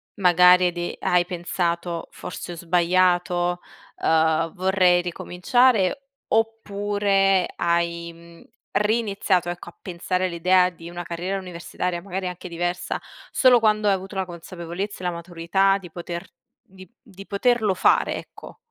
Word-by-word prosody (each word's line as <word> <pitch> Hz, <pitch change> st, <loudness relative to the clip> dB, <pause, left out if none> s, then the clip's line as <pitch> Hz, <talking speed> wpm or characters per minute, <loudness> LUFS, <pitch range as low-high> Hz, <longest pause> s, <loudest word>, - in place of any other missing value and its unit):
magari 180 Hz, -1 st, +6 dB
hai 180 Hz, -, +2 dB
de 175 Hz, 0 st, -4 dB
hai 180 Hz, 0 st, +2 dB
pensato: 175 Hz, -1 st, -3 dB
"Forse 180 Hz, -, -7 dB
ho 175 Hz, -, -6 dB
sbagliato, 175 Hz, +1 st, +1 dB, 0.4 s
ehm, 160 Hz, 0 st, +2 dB
vorrei 185 Hz, -1 st, +3 dB
ricominciare", 220 Hz, +8 st, +1 dB, 0.2 s
oppure 205 Hz, -3 st, +1 dB
hai, 170 Hz, 0 st, -1 dB
mhmm, 170 Hz, 0 st, -16 dB, 0.3 s
riniziato 205 Hz, -5 st, +1 dB
ecco, 175 Hz, 0 st, -6 dB
a -, -, -20 dB
pensare 185 Hz, +1 st, -2 dB
all'idea 180 Hz, +1 st, +3 dB
di 170 Hz, -1 st, -11 dB
una 175 Hz, 0 st, -6 dB
carriera 175 Hz, +3 st, -3 dB
universitaria 180 Hz, -1 st, -4 dB
magari 190 Hz, 0 st, -4 dB
anche 180 Hz, 0 st, -7 dB
diversa, 175 Hz, +1 st, -3 dB, 0.3 s
solo 250 Hz, -2 st, +5 dB
quando 215 Hz, -1 st, +2 dB
hai 200 Hz, -, +5 dB
avuto 190 Hz, +1 st, -5 dB
la 190 Hz, -1 st, -1 dB
consapevolezza 175 Hz, +3 st, -6 dB
e -, -, -8 dB
la -, -, 0 dB
maturità 175 Hz, +3 st, +1 dB
di 180 Hz, -3 st, -11 dB
poter 170 Hz, +2 st, -7 dB, 0.3 s
di 185 Hz, 0 st, -15 dB
di 195 Hz, -6 st, -13 dB
poterlo 215 Hz, 0 st, +1 dB
fare, 185 Hz, -, +2 dB
ecco. -, -, -12 dB
180 Hz, 135 wpm, -23 LUFS, 175-195 Hz, 0.4 s, magari